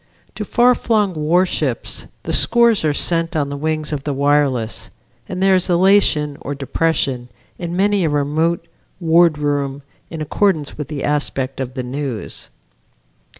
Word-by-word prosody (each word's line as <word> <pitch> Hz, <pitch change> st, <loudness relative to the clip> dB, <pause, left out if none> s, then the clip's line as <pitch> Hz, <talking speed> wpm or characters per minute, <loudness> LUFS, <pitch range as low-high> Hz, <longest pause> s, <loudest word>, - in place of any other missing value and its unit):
To -, -, -5 dB
far 245 Hz, +1 st, +4 dB
flung 210 Hz, -5 st, 0 dB
warships 155 Hz, -4 st, 0 dB, 0.2 s
the -, -, -3 dB
scores 235 Hz, -3 st, +4 dB
are 155 Hz, -, +2 dB
sent 165 Hz, +3 st, -1 dB
on 145 Hz, -2 st, 0 dB
the 140 Hz, -, -4 dB
wings 155 Hz, +1 st, -2 dB
of 140 Hz, -2 st, -4 dB
the 145 Hz, -1 st, -2 dB
wireless 140 Hz, -5 st, +1 dB, 0.4 s
and 185 Hz, 0 st, -2 dB
there 195 Hz, 0 st, +5 dB
is 185 Hz, 0 st, +1 dB
elation 175 Hz, -5 st, +3 dB
or 145 Hz, -, -4 dB
depression 135 Hz, -2 st, -1 dB, 0.3 s
in 175 Hz, -1 st, -4 dB
many 200 Hz, 0 st, +2 dB
a -, -, +1 dB
remote 155 Hz, +4 st, 0 dB, 0.3 s
wardroom 150 Hz, -5 st, +2 dB, 0.3 s
in 165 Hz, -, -7 dB
accordance 155 Hz, -1 st, 0 dB
with 150 Hz, -3 st, -5 dB
the 145 Hz, -3 st, -5 dB
aspect 140 Hz, -2 st, -1 dB
of 130 Hz, -1 st, -4 dB
the 130 Hz, -, -3 dB
news. 130 Hz, -2 st, -4 dB
150 Hz, 150 wpm, -19 LUFS, 140-175 Hz, 0.4 s, there